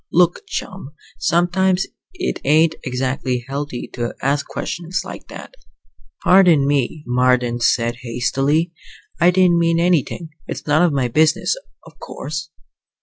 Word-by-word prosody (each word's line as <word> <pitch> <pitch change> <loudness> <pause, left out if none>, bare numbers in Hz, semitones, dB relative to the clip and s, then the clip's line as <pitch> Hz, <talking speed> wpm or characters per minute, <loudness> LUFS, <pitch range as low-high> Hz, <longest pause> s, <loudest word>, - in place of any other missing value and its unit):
"Look, 175 0 +2
chum, 165 -5 -6 0.2
sometimes 180 +2 +2 0.3
it 370 0 -3
ain't 155 +3 +4
exactly 130 -1 -2
healthy 140 -2 -4
to 120 -1 -3
ask 140 +2 0
questions 175 +2 -3
like - - -9
that." - - -10 0.7
"Pardon 180 -6 +5
me," 145 +1 0
Marden 125 -1 +2
said 120 0 +1
hastily. 135 +7 0 0.5
"I 175 - +5
didn't 180 -2 +4
mean 165 0 +2
anything. 170 -1 0 0.2
It's - - -6
none 150 +2 +3
of 175 -2 +4
my 135 -3 0
business, 155 - +2 0.3
of - - -17
course." 155 +3 -6
150 Hz, 130 wpm, -20 LUFS, 130-175 Hz, 0.7 s, Pardon